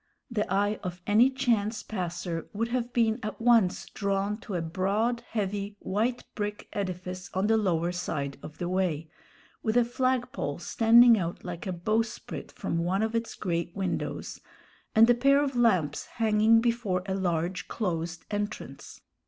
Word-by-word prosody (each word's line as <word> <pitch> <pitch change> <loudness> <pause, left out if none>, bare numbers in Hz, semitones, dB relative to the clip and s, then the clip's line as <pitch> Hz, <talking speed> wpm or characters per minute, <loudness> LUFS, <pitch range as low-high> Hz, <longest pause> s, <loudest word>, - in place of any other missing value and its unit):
The 210 -5 -1
eye 205 +2 +1
of 180 -2 -5
any 220 +5 +5
chance 235 -5 0
passer 175 -4 -4
would 230 +3 -1
have 245 0 -1
been 230 -1 +2
at 215 0 -5
once 230 -6 +3
drawn 200 0 -1
to 215 -3 -6
a 175 - 0
broad, 200 +8 0
heavy, 205 -1 -2
white 225 +6 -1
brick 210 -1 -4
edifice 185 -2 -4
on 190 +2 +1
the 225 +1 +4
lower 175 -5 +1
side 150 -6 -3
of 155 - -10
the 175 - -3
way, 175 -4 -1 0.5
with 220 +2 +1
a 240 - +5
flag 255 +1 0
pole 145 0 -3
standing 230 +4 +6
out 170 -1 -4
like 175 +2 -5
a - - -1
bowsprit 215 +6 -2
from 165 - -3
one 185 +5 +1
of 220 0 -1
its 230 0 -2
great 170 -2 -2
windows, 195 -2 -3 0.5
and 225 +1 +8
a 240 - +6
pair 275 +4 +4
of 280 -2 0
lamps 190 -11 +2
hanging 220 0 +3
before 230 -6 0
a 190 - -2
large 180 -1 -1
closed 170 -5 -3
entrance. 205 0 -5
205 Hz, 160 wpm, -28 LUFS, 180-230 Hz, 0.5 s, and